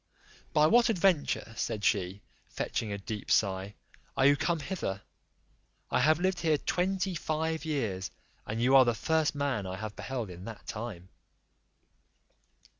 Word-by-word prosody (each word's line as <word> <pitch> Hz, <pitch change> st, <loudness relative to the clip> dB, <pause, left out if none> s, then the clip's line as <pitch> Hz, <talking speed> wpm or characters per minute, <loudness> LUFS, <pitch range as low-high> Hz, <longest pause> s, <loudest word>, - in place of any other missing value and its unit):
"By 150 Hz, -, +4 dB
what 235 Hz, +9 st, +5 dB
adventure," 175 Hz, -, +1 dB
said 110 Hz, -3 st, -2 dB
she, 95 Hz, 0 st, 0 dB, 0.3 s
fetching 110 Hz, -3 st, -3 dB
a 100 Hz, -, -2 dB
deep 105 Hz, +1 st, -6 dB
sigh, 95 Hz, 0 st, +1 dB, 0.4 s
"are 135 Hz, -, +4 dB
you 140 Hz, +1 st, +7 dB
come 165 Hz, +3 st, 0 dB
hither? 140 Hz, -, -4 dB, 0.9 s
I -, -, +3 dB
have 155 Hz, +1 st, +4 dB
lived 185 Hz, 0 st, +1 dB
here 160 Hz, -3 st, +2 dB
twenty 190 Hz, +4 st, 0 dB
five 160 Hz, 0 st, -2 dB
years, 110 Hz, -12 st, -2 dB, 0.4 s
and 110 Hz, +2 st, -3 dB
you 130 Hz, +3 st, +4 dB
are 135 Hz, -, +9 dB
the: 120 Hz, -1 st, +1 dB
first 160 Hz, +6 st, +1 dB
man 135 Hz, -9 st, -1 dB
I 95 Hz, -, -4 dB
have 110 Hz, +1 st, -6 dB
beheld 120 Hz, -7 st, -4 dB
in 90 Hz, +2 st, -10 dB
that 115 Hz, -2 st, -9 dB
time." 105 Hz, -5 st, -6 dB
130 Hz, 150 wpm, -30 LUFS, 105-160 Hz, 0.9 s, are